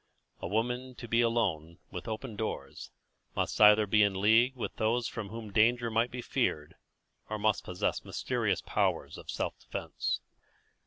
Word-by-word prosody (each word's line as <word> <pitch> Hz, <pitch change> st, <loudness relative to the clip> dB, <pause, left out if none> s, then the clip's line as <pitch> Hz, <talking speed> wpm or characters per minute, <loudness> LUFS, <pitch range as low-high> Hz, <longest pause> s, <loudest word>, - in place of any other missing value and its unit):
A -, -, -3 dB
woman 125 Hz, +5 st, -1 dB
to 120 Hz, -, -8 dB
be 115 Hz, +1 st, +3 dB
alone, 95 Hz, -9 st, 0 dB
with 90 Hz, -1 st, -6 dB
open 110 Hz, +1 st, -5 dB
doors, 110 Hz, +1 st, -5 dB, 0.5 s
must -, -, -1 dB
either 105 Hz, 0 st, +8 dB
be 105 Hz, +1 st, +3 dB
in 100 Hz, -2 st, +2 dB
league 115 Hz, +6 st, +4 dB
with 125 Hz, -, -5 dB
those 115 Hz, +2 st, +1 dB
from 110 Hz, -4 st, -5 dB
whom 110 Hz, -1 st, -7 dB
danger 115 Hz, +2 st, +3 dB
might 115 Hz, +2 st, +2 dB
be 125 Hz, 0 st, -6 dB
feared, 75 Hz, -1 st, -1 dB, 0.6 s
or 110 Hz, -, -2 dB
must 105 Hz, 0 st, +1 dB
possess 90 Hz, 0 st, -2 dB
mysterious -, -, -1 dB
powers -, -, 0 dB
of -, -, -11 dB
self -, -, -3 dB
defence. -, -, -3 dB
110 Hz, 160 wpm, -31 LUFS, 105-120 Hz, 0.6 s, either